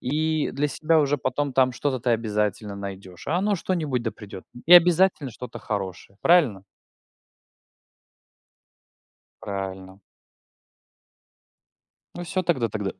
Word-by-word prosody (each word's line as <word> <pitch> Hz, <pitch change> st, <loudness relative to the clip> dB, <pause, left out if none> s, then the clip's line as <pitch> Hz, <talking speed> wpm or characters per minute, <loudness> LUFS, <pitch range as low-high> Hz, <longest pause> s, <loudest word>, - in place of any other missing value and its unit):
и 155 Hz, +3 st, 0 dB
для 145 Hz, +1 st, -1 dB
себя 155 Hz, +3 st, +1 dB
уже 145 Hz, -1 st, +1 dB
потом 140 Hz, +2 st, -2 dB
там 130 Hz, -1 st, +3 dB
что-то 130 Hz, 0 st, -2 dB
ты 120 Hz, +1 st, 0 dB
обязательно 105 Hz, -2 st, -1 dB
найдёшь. 95 Hz, -1 st, -9 dB
А 165 Hz, -, +1 dB
оно 205 Hz, +3 st, +1 dB
что-нибудь 160 Hz, -9 st, -2 dB
да 115 Hz, -, -2 dB
придёт, 100 Hz, -3 st, -11 dB, 0.2 s
и 175 Hz, -, +5 dB
обязательно 175 Hz, -4 st, +6 dB
что-то 125 Hz, +2 st, -9 dB
хорошее, 100 Hz, -3 st, -5 dB
правильно? 145 Hz, -, +4 dB, 2.8 s
Правильно! 95 Hz, -2 st, -6 dB, 2.1 s
Ну 175 Hz, -, -6 dB
всё 185 Hz, +3 st, -2 dB
тогда 145 Hz, -10 st, 0 dB
тогда 105 Hz, -3 st, -3 dB
125 Hz, 115 wpm, -24 LUFS, 100-155 Hz, 2.8 s, обязательно